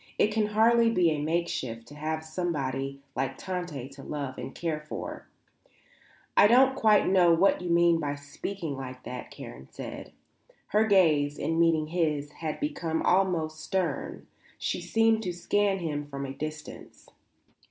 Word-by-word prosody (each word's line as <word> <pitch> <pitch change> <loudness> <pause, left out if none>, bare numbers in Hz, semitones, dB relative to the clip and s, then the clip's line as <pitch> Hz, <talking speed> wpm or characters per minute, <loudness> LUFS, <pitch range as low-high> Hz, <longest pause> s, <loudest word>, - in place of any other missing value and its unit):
It 210 - +3
can 215 -1 +2
hardly 230 +2 +4
be 180 -7 +3
a 150 -1 -1
makeshift 150 -8 -2
to - - -11
have 155 +1 -3
somebody 140 -5 -3 0.2
like 135 +1 -2
Tante 175 -8 -4
to 135 0 -12
love 140 -2 -5
and - - -7
care 165 -3 -2
for. - - -6 1.1
I - - +7
don't 260 +4 +6
quite 215 -5 +4
know 180 -3 +5
what 190 +3 +3
you 180 - -4
mean 170 0 +4
by 145 -2 -2
speaking 145 +3 -5
like 130 -1 -8
that," 125 0 -7
Karen 65 +2 -10
said. - - -8 0.6
Her 215 +2 +3
gaze, 155 -8 +4
in 165 0 -1
meeting 165 -2 +3
his, 155 -3 -1
had 155 0 -5
become 175 - -2
almost 175 -4 +1
stern. 185 +3 -2 0.3
She - - -2
seemed 225 0 +2
to 180 -5 -3
scan 195 +3 +1
him 150 -5 -3
from 140 -1 -5
a 135 - -5
distance. 155 +1 -8
165 Hz, 155 wpm, -28 LUFS, 145-190 Hz, 1.1 s, I